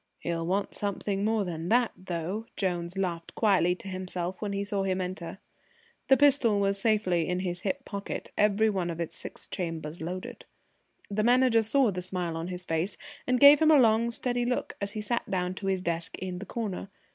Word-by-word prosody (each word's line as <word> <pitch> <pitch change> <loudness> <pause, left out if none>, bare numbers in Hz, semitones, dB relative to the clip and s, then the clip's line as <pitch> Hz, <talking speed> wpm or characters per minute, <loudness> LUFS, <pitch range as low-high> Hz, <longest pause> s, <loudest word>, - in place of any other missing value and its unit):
"He'll 165 -1 -3
want 195 +2 -1
something 200 0 -2
more 215 -1 +1
than 165 -1 -4
that, 240 0 +3
though!" 185 +4 -4
Jones 175 -1 -2
laughed 175 -3 -3
quietly 190 -5 +3
to 190 - -11
himself 185 -1 -3
when 210 -2 -2
he 200 0 -1
saw 200 -1 -1
him 190 -1 0
enter. 180 -1 -5 0.7
The 270 - +6
pistol 270 -7 +4
was 200 0 +1
safely 190 -7 +2
in 180 0 0
his 175 -1 -3
hip 275 -1 -2
pocket, 200 -1 -5
every 210 +1 +3
one 190 -5 -1
of 170 -1 -5
its 170 - -4
six - - -9
chambers 165 -2 -4
loaded. 180 +3 -6 0.7
The 210 +1 0
Manager 245 -1 +4
saw 230 +1 +3
the 180 -1 -4
smile 180 -2 -2
on 165 +1 -4
his 180 0 -6
face, 165 +4 -1 0.3
and 250 0 +2
gave 285 +2 +9
him 315 - +4
a 310 - +7
long 230 -2 +4
steady 245 +1 -1
look 245 +1 -2
as 200 0 -3
he 215 - -3
sat 235 +3 -2
down 180 -1 -1
to 195 +1 -5
his 190 -1 0
desk 170 -1 -1
in 180 -1 -5
the 200 - -8
corner. 205 -4 -4
195 Hz, 200 wpm, -28 LUFS, 180-220 Hz, 0.7 s, gave